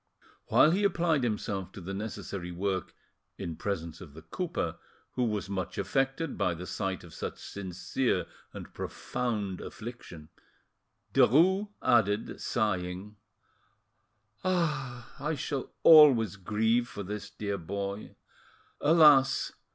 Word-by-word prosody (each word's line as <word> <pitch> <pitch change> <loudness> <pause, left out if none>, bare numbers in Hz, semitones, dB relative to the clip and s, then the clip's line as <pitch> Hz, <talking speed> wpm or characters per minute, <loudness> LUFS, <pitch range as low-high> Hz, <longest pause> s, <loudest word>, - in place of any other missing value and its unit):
While 155 - +6
he 195 +4 +1
applied 170 -6 +2
himself 100 -5 -2
to 105 - -8
the 95 +2 -6
necessary 100 -3 -5
work 95 0 -2 0.4
in 85 - -5
presence 85 -3 -4
of 75 -6 -12
the 80 - -11
cooper, 170 - -3 0.3
who 125 - -1
was 105 -3 -2
much 95 -1 -4
affected 135 - -1
by 90 -4 +1
the 90 +2 -7
sight 95 +1 -3
of 85 -3 -13
such - - -5
sincere 95 +6 -2 0.3
and - - -10
profound 105 -7 -3
affliction, 105 -9 -9 0.8
Derues 190 - +5 0.2
added, 105 -2 +2
sighing— 100 -1 -2 1.3
"I 150 -5 -2
shall 135 0 -3
always 135 - +8
grieve 110 +5 +1
for 100 - -7
this 105 +1 -6
dear 100 -1 -4
boy. 100 +4 -5 0.6
Alas! 145 -4 +5
105 Hz, 115 wpm, -29 LUFS, 95-135 Hz, 1.3 s, always